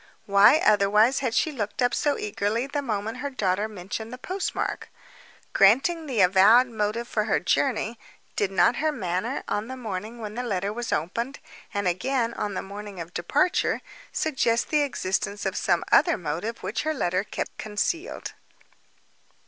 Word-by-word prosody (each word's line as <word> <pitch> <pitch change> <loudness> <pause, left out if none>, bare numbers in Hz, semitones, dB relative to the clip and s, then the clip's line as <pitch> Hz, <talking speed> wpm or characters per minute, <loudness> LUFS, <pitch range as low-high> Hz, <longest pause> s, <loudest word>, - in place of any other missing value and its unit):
Why, 200 +7 +6
otherwise, 210 +4 +4
had 250 -4 -1
she 315 - +2
looked 210 -7 -4
up 245 -1 +2
so 290 -1 +1
eagerly 210 +3 -1
the 285 +1 -3
moment 220 -4 -3
her 285 - -3
daughter 205 -5 0
mentioned 215 +2 -6
the 250 - -7
postmark. 370 +9 -3 0.6
Granting 285 - +4
the 240 -7 +1
avowed 195 +7 +6
motive 225 0 -2
for 215 -3 -1
her 215 - +2
journey—did 205 +5 -2
not 195 +5 +3
her 310 +1 +1
manner, 200 - -2
on 205 +2 -2
the 260 +1 -6
morning 220 0 -5
when 210 -2 -6
the 245 - -3
letter 200 -4 -2
was 240 +1 -4
opened, 230 - -2 0.3
and 200 -2 -1
again 230 +6 0
on 205 -3 -3
the - - -3
morning 200 -1 -8
of 170 +1 -7
departure, 285 - +1 0.3
suggest 250 -6 0
the 300 -1 +3
existence 205 -6 -2
of - - -1
some - - +1
other 340 - +5
motive 180 +6 -4
which - - -2
her 310 0 -1
letter 185 -6 0
kept - - -5
concealed? 215 - -3
215 Hz, 160 wpm, -25 LUFS, 200-255 Hz, 0.6 s, Why